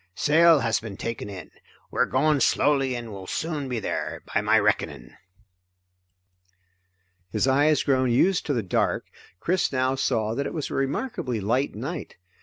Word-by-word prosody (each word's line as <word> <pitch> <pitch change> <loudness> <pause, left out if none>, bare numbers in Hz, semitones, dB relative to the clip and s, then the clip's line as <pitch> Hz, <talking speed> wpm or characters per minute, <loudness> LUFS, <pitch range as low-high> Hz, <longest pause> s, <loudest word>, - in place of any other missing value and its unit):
Sail 160 - +5
has 115 -1 +1
been 105 -4 -8
taken 115 -3 -5
in; 95 -5 -9 0.4
we - - -5
are - - +4
going 145 +2 +2
slowly 135 -2 +2
and 120 -2 -6
will 95 -2 -8
soon 150 - -3
be 125 -2 -2
there, 100 - -4
by - - +2
my - - +3
reckoning." - - -1 2.2
His 110 +7 0
eyes 145 +2 +3
grown 130 -2 +2
used 180 +10 +2
to 145 - +1
the 115 - -1
dark, 90 - 0 0.3
Chris 180 - 0
now 130 0 +1
saw 115 -5 0
that 140 +4 -2
it - - -6
was 155 - -3
a - - -4
remarkably 135 - -2
light 120 +7 0
night. 140 +9 -6
130 Hz, 165 wpm, -25 LUFS, 115-150 Hz, 2.2 s, Sail